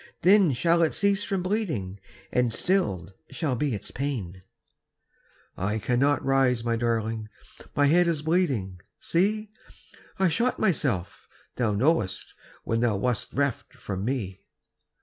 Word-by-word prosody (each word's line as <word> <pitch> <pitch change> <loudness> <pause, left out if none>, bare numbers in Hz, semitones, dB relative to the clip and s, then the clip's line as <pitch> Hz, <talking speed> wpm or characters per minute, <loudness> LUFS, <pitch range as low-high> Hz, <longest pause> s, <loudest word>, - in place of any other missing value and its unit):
Then 190 -4 +6
shall 170 +7 +2
it 160 - +2
cease 200 0 +2
from 195 -3 -2
bleeding. 155 - -2 0.3
And 125 -1 +2
stilled 105 - 0 0.2
shall 135 -1 -2
be 135 -1 -1
its 100 - -6
pain." 110 -10 -4 1.1
"I 105 +3 -1
cannot 125 +6 +1
rise, 130 -3 +2
my 115 0 0
darling, 115 -2 -1 0.5
My 145 - +4
head 170 +4 +4
is 160 -3 0
bleeding 135 - 0 0.2
see! 210 +5 0 0.7
I 190 - +3
shot 230 +10 +1
myself, 135 - -1 0.3
thou 115 -4 +1
knowest, 110 - 0 0.3
When 115 - 0
thou 115 -4 +1
wast 125 +3 -1
reft 140 -2 -2
from 95 -1 -5
me." 105 -6 -3
130 Hz, 130 wpm, -26 LUFS, 110-170 Hz, 1.1 s, Then